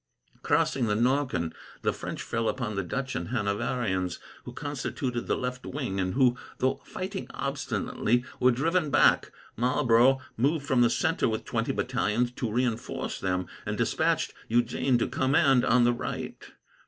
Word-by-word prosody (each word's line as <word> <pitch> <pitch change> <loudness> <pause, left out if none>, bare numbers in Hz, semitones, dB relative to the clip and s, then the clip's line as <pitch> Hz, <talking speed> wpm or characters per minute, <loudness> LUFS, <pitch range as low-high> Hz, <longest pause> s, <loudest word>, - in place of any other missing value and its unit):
Crossing 130 -4 +2
the 105 - +1
Norken, 120 - +1 0.3
the - - +2
French - - -5
fell 115 0 -1
upon 125 -4 -2
the 95 - 0
Dutch 130 +9 -3
and 85 - -3
Hanoverians, 100 -4 -1 0.3
who - - -6
constituted 130 -3 -3
the - - +1
left 125 0 -4
wing, 130 -9 -3
and 95 +2 -1
who, 125 -2 +4 0.2
though 130 +1 0
fighting 190 +1 -5
obstinately, 125 -3 -1
were 125 - +5
driven 155 +6 +1
back. - - +4 0.2
Marlborough 125 +1 +4 0.2
moved 140 +5 +1
from 130 -3 +3
the 120 - +5
centre 160 +2 +1
with 110 -1 -3
twenty 115 0 -1
battalions 120 -1 0
to 120 -2 -3
reinforce 120 0 -2
them, 90 -1 -1 0.2
and - - -3
despatched - - +1
Eugene 120 +2 +2
to 120 - 0
command 135 -1 +3
on 125 0 +4
the 120 0 +4
right. 120 - -5
125 Hz, 155 wpm, -28 LUFS, 115-135 Hz, 0.3 s, were